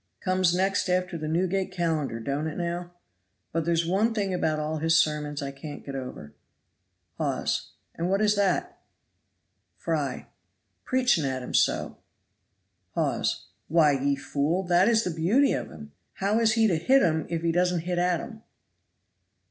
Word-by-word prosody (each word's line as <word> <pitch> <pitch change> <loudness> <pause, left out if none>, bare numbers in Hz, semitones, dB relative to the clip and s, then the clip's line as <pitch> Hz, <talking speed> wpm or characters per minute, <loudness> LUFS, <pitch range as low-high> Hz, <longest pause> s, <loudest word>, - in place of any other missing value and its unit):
Comes 185 -1 +2
next 195 +1 +1
after 180 -1 0
the 155 -2 -4
Newgate 185 +4 0
Calendar, 160 -9 -1
don't 140 +6 -2
it 155 - -5
now? 175 0 -3 0.6
But 165 -1 -1
there's 170 0 +1
one 210 +6 +1
thing 200 -3 -1
about 160 -3 0
all 155 +1 -2
his 165 +1 +3
sermons 150 -2 0
I 140 - -4
can't 145 +2 -9
get 140 - -6
over. 125 - -7 0.9
Hawes. - - -1 0.2
And 170 +2 -2
what 195 +1 +2
is 210 0 +3
that? 200 -2 0 1.0
Fry. - - -2 0.6
Preaches 250 -10 +2
at 130 -2 -2
'em - - -7
so. - - +1 1.0
Hawes. - - -1 0.2
Why, 155 -2 +4
ye 140 0 +1
fool, 145 +5 -1
that 180 +1 +3
is 225 -1 +3
the 180 - -2
beauty 190 - +3
of - - -3
him. 75 -2 -11 0.2
How 205 +3 0
is 225 -1 +3
he 225 -1 +3
to 180 -6 +2
hit 265 +12 +4
'em 160 -3 +1
if 165 -1 -2
he 170 - +2
doesn't 180 0 +1
hit 175 +1 -2
at 175 -1 +1
'em? 220 -2 -10
170 Hz, 165 wpm, -27 LUFS, 150-190 Hz, 1.0 s, Why